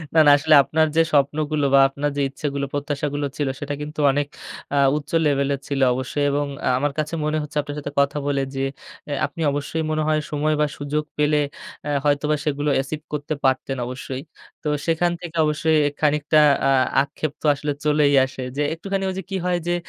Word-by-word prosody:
না, - - +7
না 145 - +9
আসলে 155 +2 +4
আপনার 160 +2 +2
যে 165 - +6
স্বপ্নগুলো 145 +1 +1
বা 140 - +7
আপনার 145 +2 -2
যে - - +1
ইচ্ছা 135 +2 -5
গুলো 140 0 -1
প্রত্যাশা 145 0 -2
গুলো 145 0 -1
ছিল 145 - 0
সেটা 145 0 -4
কিন্তু 150 +1 -7
অনেক 145 +1 -1 0.5
আ - - +2 0.2
উচ্চ 150 - -8
লেভেলের 140 -1 +1
ছিল 140 -1 -2
অবশ্যই 130 +3 -2
এবং 145 +1 0 0.2
আ - - +1
আমার 145 +2 0
কাছে 155 +2 -2
মনে 155 +1 0
হচ্ছে 150 +1 -6
আপনার 145 0 -7
সাথে 145 0 -6
কথা 140 +1 +2
বলে, 140 -1 +1
যে 135 - -1 0.4
অ্যা 145 - -2
আপনি 145 +4 -7
অবশ্যই 145 +3 -2
মনে 155 0 0
হয় 155 0 +2
সময় 150 +1 +1
বা - - +4
সুযোগ 150 +1 -2
পেলে 150 0 +3 0.5
আ - - -2 0.2
হয়তোবা 150 +1 +2
সেগুলো 145 0 0
achieve 150 +3 -6
করতে 150 +1 -2
পারতেন 135 0 +1
অবশ্যই। 130 +1 -6 0.4
তো - - -3 0.2
সেখান 170 +1 +2
থেকে 170 -2 -8
অবশ্যই 155 +1 +2 0.2
খানিকটা 150 0 +3 0.3
আ - - +4 0.3
আক্ষেপ 145 +1 -4
তো - - -7
আসলে 145 +1 -3
চলেই 150 -1 +3
আসে। 130 0 -8 0.2
যে - - +1
একটুখানি 195 +4 -3
ওই 190 - -4
যে - - -6
কি 195 - -2
হয় 180 -1 +1
যে 175 - +2
145 Hz, 200 wpm, -22 LUFS, 140-155 Hz, 0.5 s, না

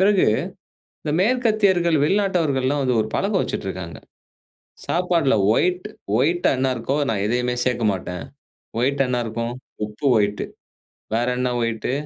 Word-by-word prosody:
பிறகு 195 0 +4 0.8
இந்த 150 - -2
மேற்கத்தியர்கள், 205 -7 +3
வெளிநாட்டவர்கள்லாம் 155 -8 +1
வந்து 125 -2 +1
ஒரு 110 - -1
பழக்கம் 200 0 +1
வச்சுட்டுருக்காங்க. - - -5 0.9
சாப்பாட்ல 170 -6 +2 0.2
ஒயிட் 180 +2 +1 0.3
ஒயிட்டா 170 +6 +2
என்ன 130 0 +2
இருக்கோ 130 +5 -2
நான் 100 -3 -1
எதையுமே 125 +2 0
சேக்க 125 -2 0
மாட்டேன். 90 -1 -5 0.6
ஒயிட் 140 +2 +1
என்ன 125 -1 0
இருக்கும்? 115 +1 -3 0.3
உப்பு 105 +7 -5
ஒயிட்டு. 105 -1 +1 0.7
வேற 120 +2 +1
என்ன 125 0 0
ஒயிட்டு? 115 +1 -1
135 Hz, 125 wpm, -22 LUFS, 120-180 Hz, 0.9 s, பிறகு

